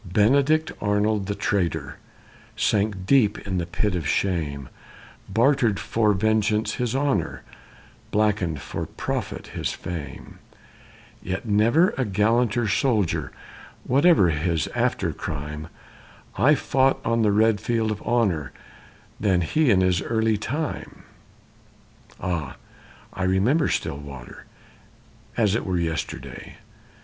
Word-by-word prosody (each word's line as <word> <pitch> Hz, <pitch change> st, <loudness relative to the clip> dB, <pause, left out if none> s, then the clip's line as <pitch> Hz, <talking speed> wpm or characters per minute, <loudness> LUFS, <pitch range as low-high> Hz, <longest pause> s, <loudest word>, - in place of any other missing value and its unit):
Benedict 140 Hz, -, +2 dB
Arnold, 105 Hz, -1 st, +1 dB
the 100 Hz, -, -2 dB
traitor, 85 Hz, -9 st, -1 dB, 0.6 s
sank 100 Hz, -2 st, 0 dB
deep 110 Hz, -2 st, +4 dB
in 95 Hz, -2 st, -1 dB
the 85 Hz, -, -3 dB
pit 95 Hz, +3 st, -1 dB
of 85 Hz, -5 st, -2 dB
shame, 75 Hz, -7 st, -1 dB, 0.6 s
Bartered 115 Hz, -, +2 dB
for 105 Hz, +3 st, +1 dB
vengeance 110 Hz, +1 st, +1 dB
his 125 Hz, -1 st, -2 dB
honor, 140 Hz, 0 st, -1 dB, 0.7 s
blackened 100 Hz, -7 st, +1 dB
for -, -, -5 dB
profit -, -, -4 dB
his -, -, -2 dB
fame; 80 Hz, -4 st, -7 dB, 0.8 s
Yet 95 Hz, +3 st, -4 dB
never 115 Hz, -, +4 dB
a -, -, +3 dB
gallanter 110 Hz, +2 st, +1 dB
soldier, 100 Hz, -, +1 dB, 0.5 s
whatever 140 Hz, -, +4 dB
his 80 Hz, +1 st, 0 dB
after -, -, 0 dB
crime, 75 Hz, +2 st, -5 dB, 0.7 s
Fought 135 Hz, -1 st, +3 dB
on 115 Hz, 0 st, +1 dB
the 105 Hz, -2 st, +3 dB
red 105 Hz, 0 st, +3 dB
field 115 Hz, -1 st, 0 dB
of 105 Hz, -, -4 dB
honor 100 Hz, -, 0 dB, 0.7 s
than 95 Hz, -4 st, +2 dB
he 150 Hz, -, +2 dB
in 95 Hz, -4 st, +4 dB
his 90 Hz, -1 st, +2 dB
early 110 Hz, -1 st, +1 dB
time. 145 Hz, +9 st, -4 dB, 1.2 s
Ah, 85 Hz, -6 st, -3 dB, 0.6 s
I 95 Hz, -, -6 dB
remember 100 Hz, -, +2 dB
Stillwater, 70 Hz, -3 st, -5 dB, 0.9 s
as 105 Hz, -4 st, +3 dB
it 115 Hz, -, 0 dB
were 95 Hz, -2 st, -1 dB
yesterday! 80 Hz, -2 st, -4 dB
105 Hz, 115 wpm, -24 LUFS, 90-115 Hz, 1.2 s, deep